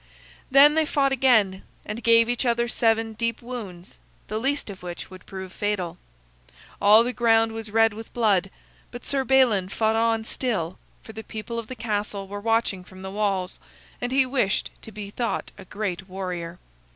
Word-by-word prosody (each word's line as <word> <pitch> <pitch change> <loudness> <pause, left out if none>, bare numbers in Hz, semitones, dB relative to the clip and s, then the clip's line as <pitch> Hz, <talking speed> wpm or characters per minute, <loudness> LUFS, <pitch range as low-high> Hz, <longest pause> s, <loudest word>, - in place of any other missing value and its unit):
Then 280 +3 +7
they 315 -1 +2
fought 275 -2 +2
again, 220 -8 +3 0.2
and 210 +3 -5
gave 230 0 +5
each 245 +1 0
other 235 -1 +1
seven 225 -1 +1
deep 230 +1 -2
wounds, 210 -8 -8 0.3
the 215 +1 -2
least 270 -2 -1
of 190 - -11
which 175 +1 -7
would 185 -1 -13
prove 190 -1 -7
fatal. 205 -5 -2 0.8
All 210 +3 +7
the 250 +1 -2
ground 225 -1 +3
was 225 -1 -6
red 225 0 +4
with 225 +2 -9
blood, 200 -5 +2 0.4
but 245 0 -10
Sir 275 -1 0
Balin 245 -8 +3
fought 220 +2 +1
on 225 0 +2
still, 210 -8 -2 0.2
for 220 - -11
the 220 +1 -7
people 220 +2 -5
of 225 - -7
the 255 - -7
castle 205 -3 -3
were 205 +1 -6
watching 225 -4 +1
from 185 +1 -13
the 190 - -6
walls, 195 -3 -1 0.4
and 245 0 -2
he 265 0 +4
wished 250 -6 0
to 220 - -10
be 205 -1 -7
thought 235 +2 -3
a 195 - -12
great 195 -1 -4
warrior. 180 -2 -5
220 Hz, 180 wpm, -25 LUFS, 195-235 Hz, 0.8 s, Then